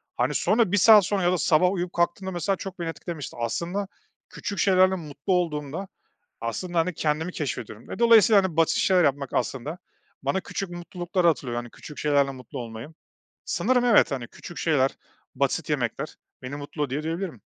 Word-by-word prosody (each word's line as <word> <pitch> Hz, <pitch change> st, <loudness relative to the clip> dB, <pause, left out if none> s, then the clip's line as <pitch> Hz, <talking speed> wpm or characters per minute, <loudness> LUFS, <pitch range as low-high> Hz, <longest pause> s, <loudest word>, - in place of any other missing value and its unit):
hani, 130 Hz, +4 st, 0 dB
sonra 210 Hz, 0 st, +2 dB
1 205 Hz, -, +3 dB
saat 210 Hz, +1 st, +8 dB
sonra 195 Hz, 0 st, 0 dB
ya 175 Hz, -, +3 dB
da 180 Hz, -, +1 dB
sabah 180 Hz, +3 st, +3 dB
uyuyup 180 Hz, -2 st, -3 dB
kalktığımda, 175 Hz, +2 st, 0 dB
mesela, 180 Hz, +2 st, 0 dB
çok 190 Hz, 0 st, -8 dB
beni 170 Hz, -1 st, -2 dB
etkilemişti. 165 Hz, -6 st, -7 dB
Aslında, 175 Hz, -, -2 dB, 0.4 s
küçük 200 Hz, -1 st, -5 dB
şeylerle 185 Hz, -1 st, +4 dB
mutlu 150 Hz, +1 st, -3 dB
olduğumda, 165 Hz, +1 st, -1 dB, 0.5 s
aslında, 170 Hz, +10 st, -2 dB
hani, 180 Hz, +2 st, +1 dB
kendimi 155 Hz, +3 st, -1 dB
keşfediyorum. 130 Hz, -9 st, -5 dB
E, -, -, -6 dB
dolayısıyla, 225 Hz, -3 st, +6 dB
hani, 175 Hz, -4 st, -3 dB
basit 165 Hz, -, +3 dB
şeyler 185 Hz, -2 st, +4 dB
yapmak, 140 Hz, -2 st, 0 dB
aslında, 135 Hz, +6 st, -2 dB, 0.5 s
bana 190 Hz, -, 0 dB
küçük 195 Hz, 0 st, -5 dB
mutlulukları 175 Hz, +1 st, -2 dB
hatırlatıyor. 125 Hz, -7 st, 0 dB
Hani, 120 Hz, -, -8 dB
küçük 150 Hz, -, -12 dB
şeylerle 140 Hz, -2 st, +2 dB
mutlu 125 Hz, -2 st, -9 dB
olmayı. 115 Hz, +1 st, -7 dB, 0.6 s
Sanırım 250 Hz, -1 st, +1 dB
evet, 225 Hz, -8 st, +5 dB
hani, 125 Hz, -4 st, -4 dB
küçük 175 Hz, -, -10 dB
şeyler, 135 Hz, -5 st, +2 dB, 0.4 s
basit -, -, -1 dB
yemekler -, -, -2 dB, 0.3 s
beni 130 Hz, +2 st, -5 dB
mutlu 145 Hz, +1 st, -4 dB
ediyor 135 Hz, +4 st, -3 dB
diyebilirim. 165 Hz, -, -4 dB
170 Hz, 170 wpm, -25 LUFS, 145-185 Hz, 0.6 s, saat